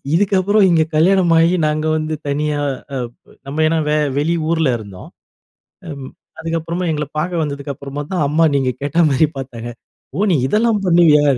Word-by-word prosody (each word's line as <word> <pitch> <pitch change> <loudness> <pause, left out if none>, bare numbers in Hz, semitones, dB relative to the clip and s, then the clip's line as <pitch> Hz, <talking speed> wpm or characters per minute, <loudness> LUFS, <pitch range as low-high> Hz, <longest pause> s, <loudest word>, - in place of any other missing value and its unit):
இதுக்கப்புறம் 200 +2 +3
இங்க 165 -2 +4
கல்யாணம் 175 +2 +3
ஆகி 170 +2 +3
நாங்க 155 +1 -1
வந்து 155 0 -2
தனியா 145 +1 -1 0.3
அ - - -3 0.5
நம்ம 150 +3 -2
ஏன்னா 165 - +1
வே 150 - +2 0.2
வெளி 160 +4 +1 0.2
ஊல 160 -4 +1
இருந்தோம். 100 -4 -11 0.8
ம், 140 -3 -8 0.3
அதுக்கப்புறமா 165 +2 -3
எங்கள்ல 150 -1 -2
பாக்க 175 +4 -2
வந்ததுக்கு 140 -1 -5
அப்புறமா 140 +2 -6
தான் 165 -5 +1
அம்மா, 165 +2 +3
நீங்க 130 -2 +1
கேட்டா 145 +4 +1
மாரி 140 +3 +3
பாத்தாங்க. 120 -3 -7 0.5
"ஓ! - - -3
நீ - - +3
இதெல்லாம் 215 +2 +1
பண்ணுவியா." 165 -4 +5
155 Hz, 160 wpm, -18 LUFS, 145-170 Hz, 0.8 s, பண்ணுவியா